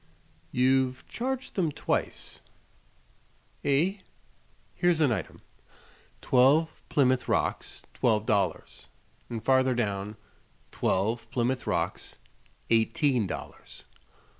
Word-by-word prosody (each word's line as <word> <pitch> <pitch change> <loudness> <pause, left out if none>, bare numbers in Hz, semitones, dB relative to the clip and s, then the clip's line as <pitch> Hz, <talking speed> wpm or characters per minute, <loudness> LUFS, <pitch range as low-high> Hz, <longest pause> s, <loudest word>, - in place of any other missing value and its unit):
You've 130 0 +1
charged 260 +2 -4
them 170 -6 0
twice." - - -3 1.2
"Eh?" 160 +8 +2 0.8
"Here's 175 -2 +2
an 150 -5 +3
item: 95 -8 -4 0.8
'Twelve 140 +6 +4 0.2
Plymouth 130 -3 +2
Rocks, - - -1
twelve 110 -3 +1
dollars;' 100 -3 -1 0.4
and 115 -2 -6
farther 130 -1 +3
down: 105 -2 -2 0.5
'Twelve 115 +5 -1
Plymouth 125 +1 -1
Rocks, - - -2 0.6
eighteen 115 +1 +2
dollars.'" - - -8
130 Hz, 90 wpm, -28 LUFS, 115-145 Hz, 1.2 s, Twelve